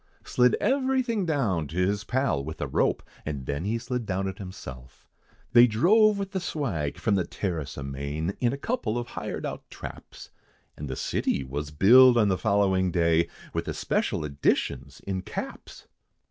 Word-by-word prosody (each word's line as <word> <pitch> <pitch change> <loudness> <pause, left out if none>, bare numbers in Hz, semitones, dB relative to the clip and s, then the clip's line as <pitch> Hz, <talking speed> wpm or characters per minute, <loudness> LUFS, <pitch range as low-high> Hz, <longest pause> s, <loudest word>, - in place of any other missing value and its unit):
Slid 125 0 +3
everything 260 -5 +1
down 105 - 0
to 80 - -8
his 100 +3 +1
pal, 125 - 0
with 80 +2 -7
a - - -1
rope, 65 - 0 0.2
And 70 -4 -5
then 70 +6 -3
he 110 +3 0
slid 120 -1 -4
down 95 0 -1
it 95 0 -6
himself, 65 -10 -10 0.5
They 120 0 +8
drove 205 - +4
with 195 -1 -4
the 190 - -1
swag, 115 - -2
from 110 - 0
the 95 -2 +2
terrace 85 -6 -4
amain, 70 +5 -3
In 120 -2 +2
a 140 - -3
couple 140 - -2
of 120 -1 -4
hired - - -5
out - - -6
traps; - - -10 0.4
And 75 -1 -7
the 65 - -3
city, 70 - -1
was 70 +3 -4
billed 120 - +7
on 105 -3 +4
the 95 - +1
following 95 -3 +2
day, 85 -1 +2 0.2
With - - -2
the - - -4
Special 75 - -1
Editions 70 -1 -1
in 95 -1 -3
caps! - - -7
95 Hz, 175 wpm, -27 LUFS, 75-125 Hz, 0.5 s, They